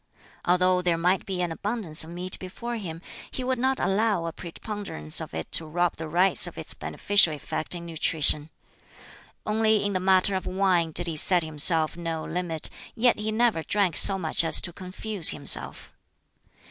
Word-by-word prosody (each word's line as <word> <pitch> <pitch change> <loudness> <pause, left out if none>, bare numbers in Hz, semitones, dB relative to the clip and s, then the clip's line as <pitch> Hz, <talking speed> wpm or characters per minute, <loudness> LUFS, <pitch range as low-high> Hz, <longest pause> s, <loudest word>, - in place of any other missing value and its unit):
Although 180 +1 +2
there 175 -2 0
might 180 +3 0
be 185 -2 -3
an 175 - -3
abundance 190 -4 -2
of 160 - -12
meat 180 +2 -5
before 235 +6 -7
him, 175 -6 -8 0.3
he 260 - -6
would 255 -1 -2
not 265 +1 0
allow 200 -3 0
a 165 - -5
preponderance 175 - -4
of - - -8
it 80 - -6
to 160 - +4
rob 175 +2 -1
the 160 - -7
rice 180 +5 +4
of - - -11
its - - -8
beneficial 200 -6 +2
effect 155 +3 -4
in 170 0 -8
nutrition. 155 -2 0 1.0
Only 215 -1 +1
in 205 - -2
the 185 - -1
matter 190 +1 +2
of 190 - -4
wine 185 -3 0
did 175 +3 +3
he 165 -2 -4
set 175 +2 +2
himself 155 +1 +3
no 165 -2 -5
limit, 165 -2 -4 0.2
yet 235 -1 +2
he 215 +1 -3
never 225 -6 +1
drank 195 0 0
so 195 - +7
much 165 -2 -1
as 165 - +6
to 175 - -5
confuse 190 +1 -1
himself. 145 - +2
180 Hz, 180 wpm, -25 LUFS, 165-205 Hz, 1.0 s, so